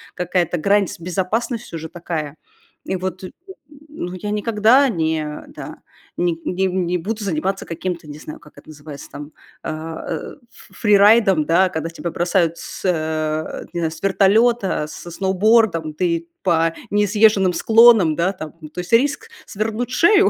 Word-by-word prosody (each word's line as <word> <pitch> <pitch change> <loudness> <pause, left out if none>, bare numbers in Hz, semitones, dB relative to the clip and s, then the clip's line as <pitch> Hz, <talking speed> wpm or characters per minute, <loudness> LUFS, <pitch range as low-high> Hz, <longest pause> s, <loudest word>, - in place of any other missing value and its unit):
какая-то 175 -1 0
грань, 200 +3 +2
с - - -8
безопасность 205 +7 -2
уже 160 -1 -6
такая. 160 -4 -5 0.5
И 190 - -2
вот 185 0 -4
н 185 - -7 0.6
ну 180 - -6
я 185 +3 -5
никогда 225 +5 +3
не 160 -6 -1 0.2
да - - -9 0.4
не 175 -2 0
не 190 +1 0
не 180 -1 -1
буду 210 +5 -4
заниматься 190 +1 -2
каким-то, 170 -1 -5
не 145 0 -8
знаю, 155 - -9
как 150 - -19
это - - -15
называется 150 -1 -10
там, 145 +2 -9 0.3
а, 160 +1 -6
э, 160 - -5 0.2
ф - - -18
фрирайдом, 205 -5 +5
да, 185 +4 +3
когда 160 -2 -4
тебя 170 +1 -5
бросают 175 -1 +1
с - - -9
э, 155 -2 -2
не 175 - -3
знаю, 160 - -1
с 160 - -11
вертолета, 200 -1 +2
со 175 +2 -10
сноубордом, 190 -3 +2
ты 170 0 -1
по 165 -2 +2 0.2
несъезженным 205 -2 +3
склонам, 220 -4 +5
да, 170 +4 +1
там 155 -5 -8
М, 155 - -9
то 180 - -8
есть 180 +6 -8
риск 290 - +2 0.2
свернуть 220 +3 -3
шею, 395 +9 +5
180 Hz, 160 wpm, -20 LUFS, 165-210 Hz, 0.6 s, фрирайдом